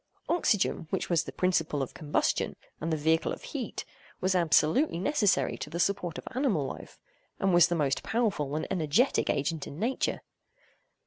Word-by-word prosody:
Oxygen, 215 - +1
which 190 - -2
was 170 - +2
the - - -6
principle 165 -6 0
of 130 - -7
combustion, 150 -2 0 0.2
and 165 +2 -2
the 160 - +1
vehicle 160 +2 +2
of - - -6
heat, - - -5 0.3
was 185 +1 +1
absolutely 170 - +3
necessary 205 - +1
to - - -5
the 170 +3 -5
support 180 -2 0
of - - -9
animal 240 - +1
life, 130 - -8 0.4
and 195 -2 +2
was 175 0 +7
the 175 - -1
most 145 -4 0
powerful 200 - -1
and 155 - -1
energetic 175 - +2
agent 150 +2 -1
in 140 - -9
nature. 235 +8 -1
175 Hz, 170 wpm, -29 LUFS, 155-200 Hz, 0.4 s, was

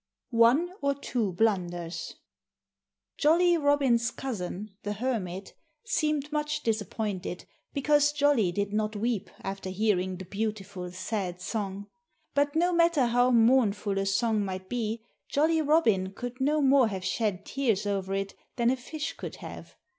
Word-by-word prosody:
XIV - - -1
ONE 270 +10 +5
OR 280 0 +1
TWO 240 -7 -2
BLUNDERS 175 -5 -1 1.0
Jolly 345 +3 +5
Robin's 280 -6 +3
cousin, 210 -6 -5
the 205 - -3
Hermit, 200 -5 -3 0.3
seemed 305 - 0
much 300 0 -1
disappointed 210 -4 -2 0.3
because 295 +1 +3
Jolly 285 -10 +3
did 200 +2 -2
not 215 0 0
weep 210 -2 -1
after 195 -1 -4
hearing 185 -2 0
the 190 - -8
beautiful, 200 -2 -4
sad 185 -1 -3
song. 200 0 -4 0.5
But 285 +1 +1
no 350 +2 +3
matter 335 -5 +4
how 245 +1 +3
mournful 225 -4 +3
a 195 - -1
song 215 +1 +1
might 185 -1 -5
be, 225 -1 -3 0.2
Jolly 320 +3 +2
Robin 225 - +2
could 245 +2 -6
no 295 +2 +2
more 270 -2 +5
have 190 -3 -4
shed 205 -4 -1
tears 235 -8 0
over 195 -1 -1
it 195 0 -2 0.2
than 235 -1 +3
a 260 - 0
fish 300 +4 -5
could - - -7
have. - - -10
225 Hz, 145 wpm, -28 LUFS, 195-280 Hz, 1.0 s, ONE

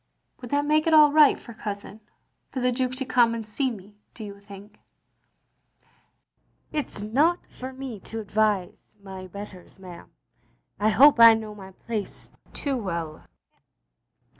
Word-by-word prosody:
"Would 245 - -8
that 285 +2 0
make 305 +2 +2
it 320 - +4
all 300 -1 +7
right 300 -1 +5
for 235 - -12
Cousin 205 -1 -7 0.2
— - - -49
for 265 - -4
the 250 0 +1
Duke 255 0 -2
to 265 +1 -4
come 240 -2 +3
and 225 -2 -6
see 260 +5 -1
me, 205 -2 -11 0.2
do 225 - -8
you 200 -1 -9
think? 200 +1 -14 0.6
" - - -41
" - - -46
It 300 -2 -3
's 205 - -6
not 295 +11 +1
for 260 +1 -9
me 260 -5 -8
to 225 +4 -7
advise 210 -3 -2
my 190 -1 -9
betters, 195 -1 -11
ma'am. 180 -3 -12 0.7
I 210 +1 +2
hope 270 +5 +6
I 230 -1 +9
know 220 -1 -6
my 195 -2 -11
place 215 0 -6 0.2
too 275 -3 -3
well. 170 -7 -5
220 Hz, 165 wpm, -25 LUFS, 200-260 Hz, 0.7 s, I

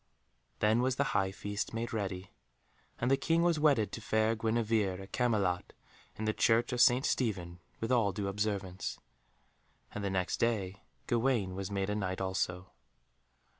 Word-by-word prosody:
Then 110 +3 +4
was 130 0 +1
the 140 - +2
high 95 -1 +2
feast 100 +3 -4
made 115 +1 -3
ready, 95 -3 -3 0.7
and 125 +3 +1
the 135 - +5
King 165 +4 +2
was 170 -3 +2
wedded 140 -8 +3
to 115 - -6
fair 110 +1 +1
Guenevere 110 -4 0
at 95 0 -10
Camelot 105 -8 0 0.4
in 110 - -4
the 110 - +1
Church 120 +3 +2
of 120 - +2
St. 125 +2 +5
Stephen 90 -8 -1 0.2
with 115 +2 -2
all 115 -5 +3
due 100 +1 -3
observance. 100 -2 -2 0.9
And 105 - -5
the 100 - 0
next 95 -2 -1
day 100 -4 -1 0.2
Gawaine 120 -6 +1
was 95 +1 -4
made 100 0 -1
a - - -1
Knight 95 -3 -2
also. 95 -1 -2
105 Hz, 165 wpm, -32 LUFS, 95-115 Hz, 0.9 s, the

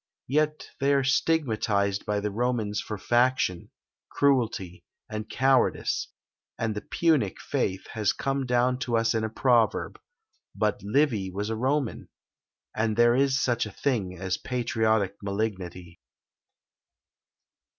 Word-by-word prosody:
Yet 150 +3 0
they 140 +1 +3
are 135 - +2
stigmatised 110 -9 +1
by 105 0 0
the 105 0 -2
Romans 110 -2 -1
for 105 +1 -5
faction, 120 -6 +1 0.4
cruelty, 115 -10 0 0.2
and 110 0 -6
cowardice; 130 -1 +2 0.5
and 110 -1 -1
the 105 - -4
"Punic" 150 - +1
faith 95 0 -2
has 105 -3 +1
come 135 -1 -2
down 125 +1 +2
to 125 -4 0
us 115 0 +2
in 110 -1 0
a 110 - -1
proverb: 115 -1 +1 0.6
but 105 +1 0
Livy 110 -3 +1
was 100 +4 -3
a - - -1
Roman! 130 +2 -1 0.7
and 110 0 0
there 120 0 +5
is 135 0 +2
such 120 -4 0
a - - -9
thing 100 -6 -2
as 95 +1 -2
a - - -21
patriotic 110 -5 0
malignity! 95 -4 -4
110 Hz, 130 wpm, -27 LUFS, 100-130 Hz, 0.7 s, there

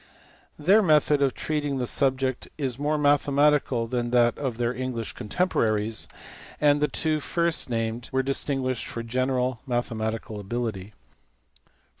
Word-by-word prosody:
Their 190 +8 +5
method 150 -5 +3
of 135 -2 +2
treating 145 -3 -2
the 125 - -1
subject 130 0 0
is 135 -4 -2
more 150 +1 0
mathematical 145 -3 +3
than 120 0 -2
that 120 -1 +3
of 130 -5 -3
their 120 0 0
English 125 -4 -4
contem 180 - -1
poraries, 110 - 0 0.5
and 145 -1 +4
the 150 - +3
two 155 0 0
first 170 -1 0
named 115 0 -2
were 130 0 +1
distinguished 135 -2 -1
for 115 - -5
general 125 +1 -1
mathematical 110 -3 -2
ability. 105 -2 -4
130 Hz, 135 wpm, -26 LUFS, 115-145 Hz, 0.5 s, Their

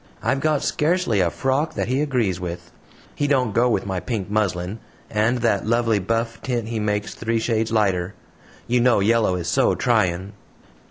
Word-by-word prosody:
I've 135 - +1
got 150 0 +1
scarcely 155 - +1
a 90 -2 +3
frock 135 - -1
that - - -1
he 130 +3 0
agrees 120 - 0
with. 85 -1 -6 0.4
He 145 - -1
don't 130 -6 +1
go 120 +3 +3
with 115 - 0
my 95 -2 -2
pink 100 +1 -4
muslin, 100 -1 -1 0.3
and 110 +3 +2
that 110 -3 +1
lovely 115 -2 +2
buff 115 +4 -2
tint 120 -3 -2
he 115 -1 -2
makes 105 -1 -1
three 115 0 -1
shades 110 -1 0
lighter. 95 -4 +1 0.5
You 120 0 +2
know 125 -2 +4
yellow 110 -1 +2
is 85 -2 -4
SO - - +2
trying." 95 -4 0
110 Hz, 175 wpm, -22 LUFS, 100-120 Hz, 0.5 s, know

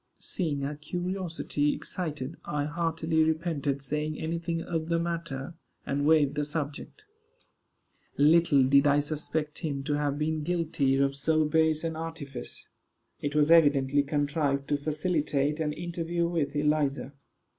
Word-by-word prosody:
Seeing 155 -7 -2
her 140 +2 -2
curiosity 170 -2 -2
excited, 155 -2 -4
I 145 -1 -2
heartily 160 0 0
repented 155 -4 -1
saying 150 +2 -2
any 165 +1 -2
thing 165 0 -3
of 165 -1 -3
the 170 - +2
matter, 165 -4 -3 0.3
and 145 +1 0
waived 150 -3 +4
the 150 0 -1
subject. 150 - -5 1.1
Little 150 -1 +5
did 140 +2 +5
I 145 0 +4
suspect 150 +1 -3
him 140 -4 -3
to 145 - -1
have 145 -1 0
been 155 +1 -1
guilty 160 -4 0
of 140 0 +1
so 155 +2 +2
base 160 0 +2
an 165 -1 -2
artifice. 150 -6 -7 0.5
It 145 0 -3
was 150 +1 +4
evidently 145 -4 +5
contrived 145 -1 0
to 145 - +2
facilitate 150 -1 0
an 155 -2 0
interview 170 +1 -2
with 160 -4 -1
Eliza. 145 -2 0
150 Hz, 140 wpm, -28 LUFS, 145-165 Hz, 1.1 s, Little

